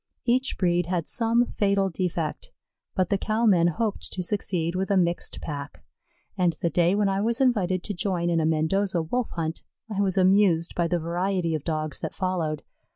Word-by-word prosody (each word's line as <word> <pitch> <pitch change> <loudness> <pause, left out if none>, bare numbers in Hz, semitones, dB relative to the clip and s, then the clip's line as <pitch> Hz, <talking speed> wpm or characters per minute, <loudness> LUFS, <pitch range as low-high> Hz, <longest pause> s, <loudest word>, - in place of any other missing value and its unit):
Each 255 +2 +1
breed 175 -2 +1
had 175 -3 -1
some 235 +1 +2
fatal 200 -3 +1
defect, 175 - -3 0.4
but 185 -3 +1
the 200 - +1
cow 220 +3 0
men 175 -6 +5
hoped 215 +5 -2
to 185 - -3
succeed 175 -3 -1
with 190 +2 -1
a 200 - +3
mixed 175 -1 0
pack, 145 -2 -6 0.5
and 180 -3 +2
the 170 - 0
day 175 +2 +3
when 205 -1 +2
I 195 0 0
was 230 +4 +1
invited 195 -9 +2
to 205 - -3
join 180 -2 -1
in 165 - +2
a 160 - +1
Mendoza 170 +3 +1
Wolf 240 +9 -2
hunt, 160 -1 -3 0.3
I 200 - +1
was 195 -1 0
amused 185 -3 +4
by 170 -1 0
the 175 +1 +1
variety 175 +1 -1
of 155 -3 -2
Dogs 155 -3 -2
that - - -5
followed. 170 -5 -2
180 Hz, 190 wpm, -26 LUFS, 170-200 Hz, 0.5 s, men